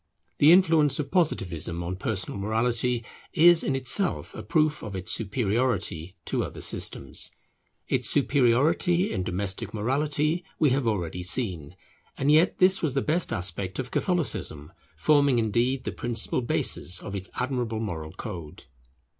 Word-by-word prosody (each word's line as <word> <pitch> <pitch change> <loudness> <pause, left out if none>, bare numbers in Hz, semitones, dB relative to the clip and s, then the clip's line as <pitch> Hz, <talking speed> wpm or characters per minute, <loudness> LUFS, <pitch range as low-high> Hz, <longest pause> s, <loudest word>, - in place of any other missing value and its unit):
The 150 +2 +7
influence 160 -6 +4
of 140 -2 -4
Positivism 90 - -1
on 90 +2 -4
personal 95 0 -3
morality 115 +3 0 0.3
is 170 +1 +6
in 135 - 0
itself 135 +9 +1
a - - -7
proof 155 -2 +1
of 105 -3 -7
its 95 -1 -3
superiority 105 -5 -1
to - - -1
other - - -7
systems. - - -2 0.6
Its - - 0
superiority 145 - +2
in - - -2
domestic 95 +3 -2
morality 150 +8 0
we 150 -4 +3
have 130 -2 0
already 90 -5 -2
seen, 90 - -2 0.4
and 140 +2 +2
yet 160 +4 +4
this 185 +1 +4
was 145 -5 -1
the 135 - +1
best 165 +3 0
aspect 95 -2 -3
of 130 -2 -5
Catholicism, 90 - -2 0.2
forming 145 -4 +3
indeed 120 +4 0
the - - -3
principal 120 +1 -1
basis 90 -6 0
of 100 - -8
its 95 -1 -5
admirable 125 -4 -2
moral 80 -8 -5
code. 85 -9 -8
120 Hz, 145 wpm, -26 LUFS, 95-150 Hz, 0.6 s, The